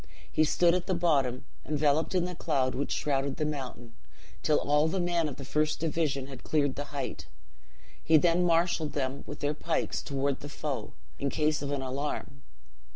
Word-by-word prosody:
He 155 - +3
stood 170 +2 +4
at 180 +1 -1
the 185 - +1
bottom, 140 -7 +1 0.2
enveloped 150 +3 +1
in 180 -1 +3
the 180 - -4
cloud 135 -6 0
which 140 - -2
shrouded 140 -1 0
the 155 - 0
mountain, 130 -5 -5 0.5
till 150 - +3
all 150 +2 +3
the 185 +4 -1
men 175 -3 +1
of 140 - -7
the 135 - -8
first 150 +3 +1
division 155 -4 0
had 135 -2 -10
cleared 145 -3 +1
the 145 - -4
height; 145 -1 -5 0.8
he 160 +1 +6
then 170 +3 +3
marshaled 170 -2 +2
them 135 -1 -2
with 145 - -7
their 145 +1 +1
pikes 160 +2 -1
toward 140 -1 -1
the 145 - -8
foe, 145 -1 -4 0.3
in 140 - 0
case 155 +2 +1
of 140 - -3
an 140 -2 -1
alarm. 130 - -4
150 Hz, 185 wpm, -29 LUFS, 140-160 Hz, 0.8 s, he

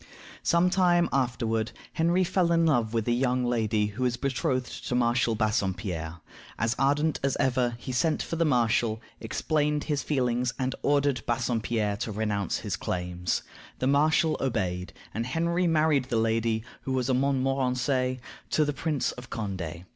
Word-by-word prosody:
Some 175 +1 +3
time 175 -2 +4
afterward 120 -4 0 0.2
Henry 170 +3 +2
fell 175 -1 +1
in 165 0 +4
love 120 -8 +2
with 115 -1 -1
a - - +2
young 125 0 +1
lady 110 -3 +1
who 105 +4 -6
was 125 -1 +1
betrothed 130 -1 -2
to 125 - -1
Marshal 120 -1 +2
Bassompierre. 95 -7 -2 0.4
As 115 +1 0
ardent 145 +3 +2
as 135 -1 0
ever, 125 -2 +1
he 130 - -6
sent 155 +5 +1
for - - -4
the 165 - +2
marshal, 115 -5 +2 0.2
explained 150 +5 0
his 145 -3 -1
feelings, 125 -3 0
and 130 -1 -1
ordered 140 -3 +2
Bassompierre 115 -3 0
to 110 - -3
renounce 105 -3 -1
his - - -3
claims. 90 -1 -2 0.3
The - - -2
marshal 155 +3 +3
obeyed, 95 -8 -2 0.2
and 115 - -1
Henry 170 +5 +1
married 155 -4 +3
the 125 -3 -1
lady 110 0 +1 0.2
(who 130 - -3
was 130 -1 0
a 130 - +2
Montmorency) 130 -1 +1 0.3
to 155 - +2
the 145 - -1
Prince 150 -1 -1
of 125 0 -11
Condé. 95 -6 -5
125 Hz, 160 wpm, -27 LUFS, 110-145 Hz, 0.4 s, time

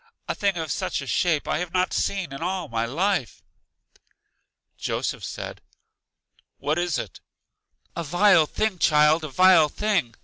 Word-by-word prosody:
A - - -1
thing 200 -3 0
of 160 -3 -3
such 140 - -2
a - - -8
shape 155 +2 0
I - - 0
have 180 0 -5
not 185 0 +1
seen 190 -8 -2
in 135 - -8
all 180 -1 -2
my 115 -2 -2
life! 170 - -1 1.3
Joseph - - -3
said, - - -7 1.0
What 155 +3 -1
is 175 -4 0
it? - - -7 0.8
A 170 - -3
vile 175 +1 +4
thing, 215 -1 -2
child, 150 +1 +4
a 155 - -4
vile 185 +1 +5
thing! 195 - -1
170 Hz, 150 wpm, -24 LUFS, 150-185 Hz, 1.3 s, vile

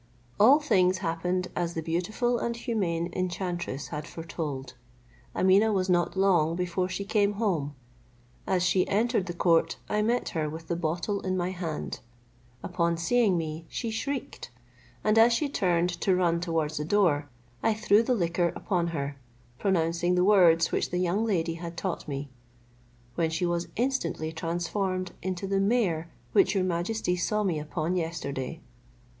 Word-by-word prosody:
All 255 +8 +7
things 185 -10 +3
happened 180 +2 -1
as 170 -1 -2
the 160 - -2
beautiful 215 +9 0
and 235 - -2
humane 180 -8 -2
enchantress 175 -5 -3
had 150 +2 -5
foretold. 150 -6 -5 0.6
Ameeneh 195 +4 +4
was 190 -2 +1
not 175 +1 +1
long 175 -4 +3
before 180 +1 -1
she 195 +2 -4
came 205 0 +2
home. 175 -10 -1 0.7
As 180 -2 +2
she 180 +1 +2
entered 220 -2 +1
the 175 - -4
court, 165 -2 +2
I 210 - 0
met 235 +3 0
her 155 -3 -2
with 160 +1 -9
the 170 - 0
bottle 175 +5 -2
in 185 -1 -1
my 180 0 -1
hand. 170 -4 -4 0.6
Upon 170 -2 0
seeing 200 +2 +2
me, 160 0 -4
she 230 -2 -3
shrieked; 270 +4 -4 0.5
and 215 +1 +4
as 230 +1 +6
she 295 +5 +1
turned 180 -9 +1
to 190 - +3
run 170 -2 +1
towards 160 -3 -1
the 150 - -1
door, 160 -6 +2 0.3
I 220 - +2
threw 210 0 +4
the 245 +2 +1
liquor 170 -3 +1
upon 175 -5 -1
her, 140 -4 -4 0.4
pronouncing 175 -1 +1
the 180 - +3
words 175 -5 +5
which - - 0
the 180 - -2
young 180 +4 +1
lady 175 -7 0
had 170 -1 -6
taught 180 -2 -3
me, 140 -1 -5 0.8
when 165 +4 0
she 165 +2 -1
was 175 0 -1
instantly 245 -10 -1
transformed 175 +3 -2
into 185 +1 -3
the 195 0 0
mare 195 -6 +1 0.2
which 385 - +4
your 190 - +2
majesty 180 +2 -1
saw 210 +4 0
me 175 -6 0
upon 155 +3 -2
yesterday. 160 -3 -3
180 Hz, 160 wpm, -28 LUFS, 165-200 Hz, 0.8 s, All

